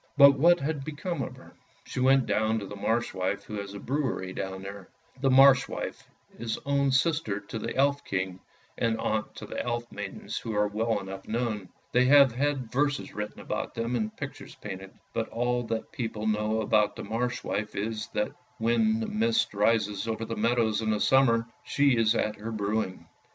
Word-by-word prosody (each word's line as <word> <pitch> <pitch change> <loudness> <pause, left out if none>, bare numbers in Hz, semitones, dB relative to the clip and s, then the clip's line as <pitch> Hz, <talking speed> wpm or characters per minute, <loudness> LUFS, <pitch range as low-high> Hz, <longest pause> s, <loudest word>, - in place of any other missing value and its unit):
But 140 -1 +8
what 175 +4 +6
had 145 0 -2
become 155 +2 -4
of - - -4
her? - - -15 0.3
She - - -5
went 135 0 +5
down 110 +1 +1
to 105 - -4
the 105 - -8
Marsh 115 +4 0
wife 95 +2 -2
who 105 -1 -5
has 100 0 -6
a - - -6
brewery 125 -8 -2
down 95 0 -5
there. 100 -1 -8 0.3
The 135 0 +2
Marsh 135 0 +7
wife - - -6 0.3
is 115 -1 -2
own 140 -1 +2
sister 130 -6 +1
to 105 +2 -7
the - - -4
Elf 140 +1 +2
king, 95 -1 -2 0.4
and 115 -1 +1
aunt 110 0 -1
to - - -7
the - - -4
Elf 120 0 -3
maidens - - -5
who 110 -2 -4
are 105 0 +3
well 110 +1 0
enough 95 0 -8
known. 110 -4 -2 0.2
They 125 +1 +4
have 140 -1 +7
had 135 -2 -1
verses 145 +2 0
written 105 0 -5
about - - -4
them 115 +2 -1
and 110 -2 -2
pictures - - -7
painted; 95 0 -7 0.2
but 115 -1 -2
all 120 +1 0
that 115 0 -3
people 115 -7 -4
know 110 +1 +1
about 105 -1 +2
the - - -6
Marsh 115 +4 -2
wife, 105 0 -3
is 110 +1 -3
that 105 - 0 0.3
when 220 - +2
the 225 - -2
mist 225 - +1
rises 105 0 +1
over 115 0 -2
the 115 - -4
meadows 115 -1 +2
in 110 - -1
the 105 -1 +1
summer, 115 -3 +4 0.2
she 140 -2 +3
is 115 -1 +3
at 105 -1 0
her 110 +2 -5
brewing. 105 -2 -2
115 Hz, 195 wpm, -28 LUFS, 105-135 Hz, 0.4 s, But